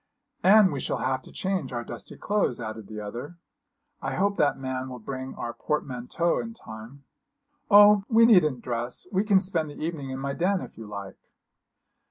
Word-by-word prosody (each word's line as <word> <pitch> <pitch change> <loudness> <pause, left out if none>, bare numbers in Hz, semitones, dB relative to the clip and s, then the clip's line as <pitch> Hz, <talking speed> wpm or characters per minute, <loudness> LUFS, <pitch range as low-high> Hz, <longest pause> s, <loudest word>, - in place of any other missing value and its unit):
'And 200 -1 +6
we 140 - -3
shall - - -2
have 130 0 -1
to - - -15
change 185 -8 -2
our 120 -1 -3
dusty - - -9
clothes,' 205 - 0
added 110 -2 -6
the 110 -1 -7
other; 120 +11 -7 0.6
'I - - -3
hope 200 +1 +1
that 145 - +2
man 130 0 -4
will 125 - -7
bring 130 +3 -6
our 120 - -5
portmanteaux 150 +4 -1
in 230 -1 -6
time.' 115 - -11 0.7
'Oh, 205 -1 +8
we 230 -1 +6
needn't 155 - +4
dress. 120 0 -3
We 195 +1 +2
can 205 -3 +4
spend 175 -5 -1
the 145 - -10
evening 155 -4 -4
in 130 - -4
my 140 +1 -3
den, 185 +5 +1
if - - -9
you 110 -1 -9
like!' 100 -2 -9
140 Hz, 185 wpm, -26 LUFS, 120-190 Hz, 0.7 s, Oh